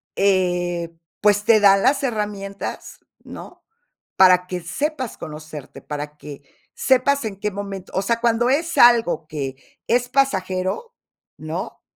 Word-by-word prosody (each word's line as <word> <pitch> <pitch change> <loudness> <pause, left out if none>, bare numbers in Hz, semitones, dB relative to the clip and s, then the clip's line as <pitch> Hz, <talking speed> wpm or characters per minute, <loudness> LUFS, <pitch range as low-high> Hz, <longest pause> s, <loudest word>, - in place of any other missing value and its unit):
eh, 175 -3 0 0.3
pues, 205 0 +3
te 220 -2 +6
da 195 -1 +6
las 270 +8 +2
herramientas, 205 -5 -4 0.2
¿no? - - -11 0.5
Para 180 -1 +5
que 180 -1 -4
sepas 260 - -3
conocerte, 155 -2 -9
para 150 0 -6
que 145 -1 -10 0.3
sepas 265 +1 +2
en 200 -3 -5
qué 210 +1 -2
momento. 195 -1 -7
O 190 - +1
sea, 230 +4 0
cuando 240 +1 +2
es 325 +5 0
algo 230 -9 +5
que 140 -4 -5 0.3
es 245 +1 +1
pasajero, 195 - -1 0.4
¿no? 160 +4 -6
195 Hz, 130 wpm, -21 LUFS, 175-240 Hz, 0.5 s, te